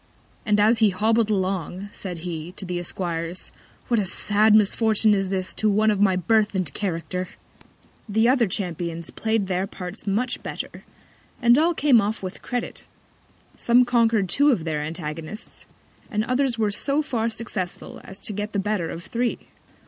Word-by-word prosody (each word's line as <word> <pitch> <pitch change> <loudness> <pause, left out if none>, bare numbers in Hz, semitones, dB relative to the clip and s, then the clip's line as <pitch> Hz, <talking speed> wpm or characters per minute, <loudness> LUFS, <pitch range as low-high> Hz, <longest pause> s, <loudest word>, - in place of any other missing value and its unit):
And 210 0 +3
as 220 +2 +4
he 220 -2 +5
hobbled 220 +3 +2
along, 190 -1 -2
said 180 -4 -6
he, 170 0 -5
to 195 - -7
the 180 -1 -3
Esquires, 175 -1 -4 0.4
what 235 -3 +2
a 205 - 0
sad 210 +3 +4
Misfortune 215 0 +3
is 195 -2 0
this 190 -1 -2
to 215 - +1
One 215 +1 +3
of 205 -1 0
my 195 -2 +4
Birth 210 +3 +2
and 180 -7 -1
Character! 180 -1 -3 0.8
The 220 +3 +3
other 250 -3 +4
Champions 170 -3 -3
play'd 220 -2 0
their 185 +1 -1
Parts 190 +2 -8
much 215 +6 0
better; - - -6 0.6
and 240 -1 +6
all 325 +4 +3
came 275 -7 +5
off 210 +1 -2
with 185 0 -6
Credit. 245 -1 -4 0.7
Some 245 +1 +4
conquer'd 230 -4 +3
two 285 +10 +4
of 230 - +2
their 155 -2 -2
Antagonists, 155 +5 -6 0.4
and 215 0 0
others 255 0 +1
were 215 -2 +1
so 280 +8 +1
far 230 -5 -1
successful 220 -5 -5
as 195 +1 -8
to 210 - -2
get 210 +1 -4
the - - 0
better 195 -4 -1
of 170 - -6
three. 240 +3 -2
205 Hz, 170 wpm, -24 LUFS, 180-225 Hz, 0.8 s, and